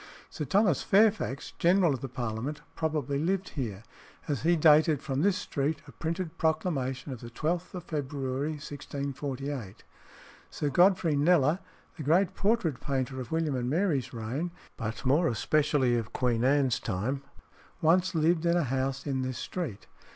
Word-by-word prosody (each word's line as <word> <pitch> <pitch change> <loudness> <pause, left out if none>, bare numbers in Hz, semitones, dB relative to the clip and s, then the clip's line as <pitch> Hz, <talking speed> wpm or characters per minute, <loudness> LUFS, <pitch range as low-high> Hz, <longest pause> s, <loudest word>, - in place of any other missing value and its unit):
Sir 150 - -4
Thomas 190 - +3
Fairfax, 205 -9 +2
general 175 -2 +4
of 130 - -5
the 135 - -5
Parliament, 120 +4 -4
probably 150 -3 -1
lived 190 +4 0
here, 110 -8 -4 0.4
as 145 -5 -1
he 170 +2 +3
dated 155 -1 +5
from 135 -1 -2
this 195 +1 +3
street 145 -3 -2
a - - -10
printed 165 +6 -4
proclamation 145 -5 -1
of 125 - -9
the 120 - -8
12th 165 +9 -2
of 180 - -5
February 140 -1 -2
1648. 140 -5 -5 0.7
Sir 145 - -2
Godfrey 175 -1 +4
Kneller, 155 +2 +4 0.4
the - - -6
great 170 +6 +3
portrait 195 - +1
painter 130 -1 -2
of 120 - -9
William 160 -2 0
and 125 -1 -1
Mary's 150 -6 +1
reign, 125 +9 -3 0.3
but 110 +2 -5
more 150 +6 +4
especially 140 +1 +2
of 115 -2 -3
Queen 120 -2 +1
Anne's 135 -2 +3
time, 115 +7 -2 0.6
once 180 +3 +3
lived 165 +1 +2
in 170 +1 +3
a 175 - +2
house 135 0 -2
in 135 -3 -1
this 130 -1 -3
street. 145 - -5
145 Hz, 155 wpm, -29 LUFS, 130-165 Hz, 0.7 s, dated